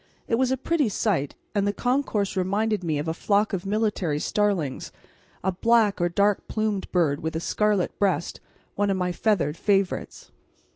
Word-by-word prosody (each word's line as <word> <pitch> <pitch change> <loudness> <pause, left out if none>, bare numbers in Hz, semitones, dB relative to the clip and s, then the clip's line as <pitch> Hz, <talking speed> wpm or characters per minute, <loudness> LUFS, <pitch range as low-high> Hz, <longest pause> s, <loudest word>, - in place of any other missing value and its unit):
It - - -3
was 260 -1 +2
a 265 - +1
pretty 290 -1 +1
sight, 185 -8 -1 0.2
and 200 -1 +1
the 205 - +1
concourse 245 -5 0
reminded 200 +2 0
me 160 -3 0
of 150 +3 -3
a 160 - 0
flock 205 +4 +1
of 190 0 -3
military 205 -7 0
starlings, 180 -5 -1 0.5
a 190 - +1
black 215 0 +2
or 175 - +2
dark 200 +3 +1
plumaged 215 -3 -2
bird 160 -6 +2
with 160 0 -3
a - - 0
scarlet 210 +2 0
breast, 185 -5 0 0.3
one 205 0 0
of 195 - +1
my 180 -1 0
feathered 175 -6 0
favourites. 195 -1 -1
200 Hz, 175 wpm, -25 LUFS, 175-215 Hz, 0.5 s, was